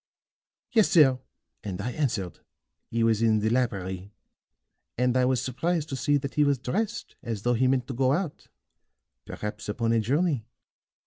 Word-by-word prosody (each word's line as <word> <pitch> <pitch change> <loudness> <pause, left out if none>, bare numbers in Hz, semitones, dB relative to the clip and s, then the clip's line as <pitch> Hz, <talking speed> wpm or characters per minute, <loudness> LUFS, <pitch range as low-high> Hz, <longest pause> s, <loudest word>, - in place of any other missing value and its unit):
"Yes, 225 -5 +4
sir; 135 -6 +5 0.4
and 95 -3 -5
I 115 +5 -2
answered. 120 - -2 0.5
He 115 0 0
was 115 -1 +2
in 110 -1 +4
the 110 +1 0
library, 100 -6 -1 0.9
and 125 +1 +2
I 130 0 +4
was 130 -1 +1
surprised 155 +5 -1
to 135 - -3
see 140 +3 +2
that 140 -1 -5
he 150 - +3
was 140 -1 +2
dressed 210 - -3
as 115 -4 -4
though 120 - +2
he 125 +2 +2
meant 130 -1 +1
to 135 - -5
go 130 +1 +2
out 165 +1 -2 0.8
perhaps 105 0 -6
upon 115 +2 0
a 115 - +3
journey. 140 +3 +1
125 Hz, 170 wpm, -27 LUFS, 115-145 Hz, 0.9 s, sir